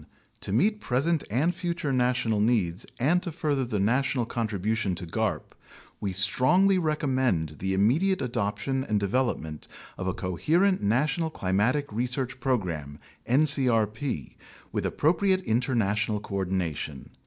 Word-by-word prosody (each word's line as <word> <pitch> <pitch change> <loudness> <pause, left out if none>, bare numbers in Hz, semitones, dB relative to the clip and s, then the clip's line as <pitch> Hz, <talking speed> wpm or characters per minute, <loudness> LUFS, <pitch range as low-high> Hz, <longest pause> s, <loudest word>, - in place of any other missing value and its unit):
To - - -5
meet 210 - +2
present 145 +6 +1
and 140 - +1
future 170 -6 -2
national 125 -4 +1
needs 105 -6 +1
and 160 +8 +3
to 175 - -5
further 145 -4 -1
the 110 -4 -2
national 125 +4 +1
contribution 110 -3 -1
to 90 +1 -5
garp, 80 - -2 0.5
we 100 - -2
strongly 175 - +3
recommend 130 - 0
the 95 0 -1
immediate 155 - +2
adoption 125 +3 -1
and 105 -5 0
development 100 -8 -1 0.3
of 90 - -3
a 95 - -1
coherent 165 - +1
National 140 +10 +1
Climatic 115 +5 0
Research 125 +2 -2
Program 85 - -2 0.3
(ncrp) 125 - +1 0.4
with - - -1
appropriate 185 +5 +2
international 110 - 0
coordination. 90 -8 -3
120 Hz, 120 wpm, -27 LUFS, 100-145 Hz, 0.5 s, and